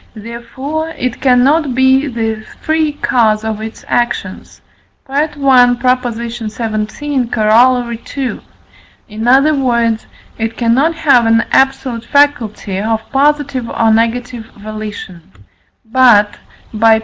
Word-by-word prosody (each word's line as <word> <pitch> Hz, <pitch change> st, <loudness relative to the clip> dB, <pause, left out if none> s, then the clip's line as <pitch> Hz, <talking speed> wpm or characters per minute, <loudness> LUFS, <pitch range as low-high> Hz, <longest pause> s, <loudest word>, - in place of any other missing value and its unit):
therefore 240 Hz, +8 st, -6 dB
it 255 Hz, -6 st, -4 dB
cannot 265 Hz, +2 st, +3 dB
be 260 Hz, +2 st, +3 dB
the 225 Hz, -3 st, -3 dB, 0.2 s
free 315 Hz, -1 st, 0 dB
cause 225 Hz, -7 st, +1 dB
of 220 Hz, -1 st, -4 dB
its 220 Hz, 0 st, -8 dB
actions 240 Hz, 0 st, -3 dB, 0.5 s
(I. 285 Hz, +3 st, 0 dB
xvii. 295 Hz, -2 st, -14 dB
Coroll. 240 Hz, -1 st, +1 dB
ii.); 265 Hz, -3 st, -3 dB, 0.7 s
in 220 Hz, +2 st, -5 dB
other 275 Hz, +5 st, +4 dB
words, 235 Hz, -5 st, 0 dB, 0.3 s
it 225 Hz, +1 st, -3 dB
cannot 260 Hz, +8 st, +1 dB
have 270 Hz, -8 st, +3 dB
an 225 Hz, 0 st, +3 dB
absolute 265 Hz, -3 st, +1 dB
faculty 235 Hz, -9 st, 0 dB
of 220 Hz, +1 st, -3 dB
positive 280 Hz, -3 st, 0 dB
or 225 Hz, -1 st, +1 dB
negative 230 Hz, +1 st, -1 dB
volition; 210 Hz, -4 st, -8 dB, 0.6 s
but 225 Hz, -3 st, +4 dB, 0.4 s
(by 220 Hz, +1 st, +4 dB
I. -, -, 0 dB
240 Hz, 110 wpm, -14 LUFS, 225-270 Hz, 0.7 s, other